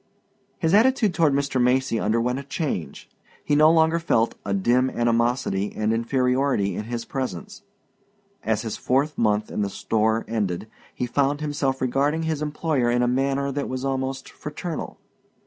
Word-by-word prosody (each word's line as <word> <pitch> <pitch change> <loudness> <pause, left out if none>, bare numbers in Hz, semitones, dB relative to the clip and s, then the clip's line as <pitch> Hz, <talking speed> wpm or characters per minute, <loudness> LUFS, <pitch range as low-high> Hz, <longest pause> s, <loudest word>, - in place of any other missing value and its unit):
His 165 0 0
attitude 220 -2 +4
toward 160 -4 +3
Mr. 140 -2 0
Macy 125 -1 +2
underwent 115 +4 0
a - - -7
change. 140 - -4 0.4
He 145 - +2
no 155 +1 +6
longer 165 0 +3
felt 115 -8 +1
a 100 - -4
dim 120 +7 +2
animosity 115 -4 0
and 110 +1 0
inferiority 125 -2 +1
in 105 - -4
his 115 0 -4
presence. 195 +11 -5 0.8
As 110 0 0
his 110 - -4
fourth 140 +3 0
month 110 -2 +1
in - - -2
the 100 - 0
store 110 +3 0
ended 105 -4 -2 0.3
he 125 - -2
found 140 +3 0
himself 145 -3 -1
regarding 140 +5 +1
his 160 -2 -2
employer 150 -4 0
in 120 +1 +2
a - - +2
manner 135 +2 0
that 140 +1 -3
was 130 +1 -3
almost 135 0 -2
fraternal. 155 +2 -6
130 Hz, 160 wpm, -24 LUFS, 115-145 Hz, 0.8 s, no